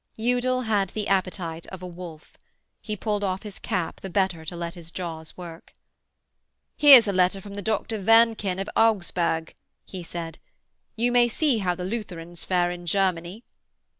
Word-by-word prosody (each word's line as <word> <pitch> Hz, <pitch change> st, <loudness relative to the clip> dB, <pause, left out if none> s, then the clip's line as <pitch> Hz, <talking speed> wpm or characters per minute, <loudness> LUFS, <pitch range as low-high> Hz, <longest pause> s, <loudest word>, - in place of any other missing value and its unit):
Udal 250 Hz, +2 st, +1 dB
had 210 Hz, -5 st, +1 dB
the 210 Hz, +1 st, -4 dB
appetite 180 Hz, -4 st, -1 dB
of 185 Hz, -1 st, -9 dB
a -, -, -4 dB
wolf. 170 Hz, -3 st, -10 dB, 0.5 s
He 215 Hz, -, -4 dB
pulled 210 Hz, 0 st, -2 dB
off 190 Hz, 0 st, -2 dB
his 210 Hz, -2 st, -8 dB
cap 180 Hz, -7 st, -3 dB
the 195 Hz, -, -6 dB
better 185 Hz, -3 st, 0 dB
to 175 Hz, -, -5 dB
let 170 Hz, 0 st, -4 dB
his 170 Hz, -2 st, -10 dB
jaws 165 Hz, -3 st, -6 dB
work. 170 Hz, -2 st, -10 dB, 1.0 s
'Here's 270 Hz, -6 st, +9 dB
a 200 Hz, -, 0 dB
letter 185 Hz, +1 st, +2 dB
from 200 Hz, +1 st, -10 dB
the 205 Hz, -, -5 dB
Doctor 220 Hz, +1 st, -1 dB
Wernken 225 Hz, -2 st, +4 dB
of 195 Hz, -, -3 dB
Augsburg,' 175 Hz, -7 st, +1 dB, 0.3 s
he 185 Hz, -, -7 dB
said. 165 Hz, -1 st, -7 dB, 0.6 s
'You 240 Hz, +2 st, +1 dB
may 240 Hz, 0 st, +5 dB
see 255 Hz, 0 st, +1 dB
how 180 Hz, -3 st, 0 dB
the 180 Hz, 0 st, -5 dB
Lutherans 175 Hz, -5 st, -5 dB
fare 175 Hz, -1 st, +1 dB
in 175 Hz, 0 st, -8 dB
Germany.' 185 Hz, +2 st, 0 dB
190 Hz, 165 wpm, -25 LUFS, 175-220 Hz, 1.0 s, Here's